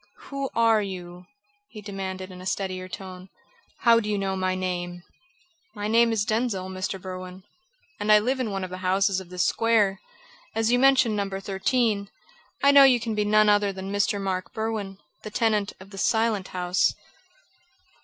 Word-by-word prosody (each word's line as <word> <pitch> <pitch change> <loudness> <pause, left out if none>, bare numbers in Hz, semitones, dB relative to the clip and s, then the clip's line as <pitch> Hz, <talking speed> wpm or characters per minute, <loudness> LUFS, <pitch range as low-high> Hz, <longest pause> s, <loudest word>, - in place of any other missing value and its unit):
"Who 275 -1 -3
are 225 -2 +4
you?" 180 -2 -7 0.4
he 215 - -11
demanded 190 -2 -6
in 180 0 -10
a - - -10
steadier 185 -1 -3
tone. 185 -1 -9 0.5
"How 230 -1 +6
do 210 -2 -4
you 205 - 0
know 195 -1 -1
my 185 0 -1
name?" 175 -1 -4 0.7
"My 205 0 -3
name 230 +1 +4
is 215 -2 0
Denzil, 215 -5 -1
Mr. 190 +1 -4
Berwin, 185 0 -8 0.6
and 210 +1 +1
I 210 - +9
live 255 +5 0
in 250 -4 -1
one 195 -1 -3
of 185 - -6
the 185 - -6
houses 190 +1 +1
of 185 -2 -11
this 180 0 -1
square. 210 -4 +2 0.5
As 225 +1 +1
you 245 - +3
mention 260 -4 +4
No. 200 -1 -1
13, 200 +2 -1 0.5
I 280 - +7
know 280 -1 +8
you 255 -3 +6
can 225 -1 -3
be 210 -1 0
none 215 0 +4
other 205 -1 +3
than 195 +1 -6
Mr. 205 0 +1
Mark 185 -2 -3
Berwin, 220 -3 -3 0.2
the 215 - -7
tenant 215 -2 0
of 190 +1 -14
the 195 - -8
Silent 220 -2 +1
House." 180 0 0
200 Hz, 180 wpm, -25 LUFS, 185-220 Hz, 0.7 s, I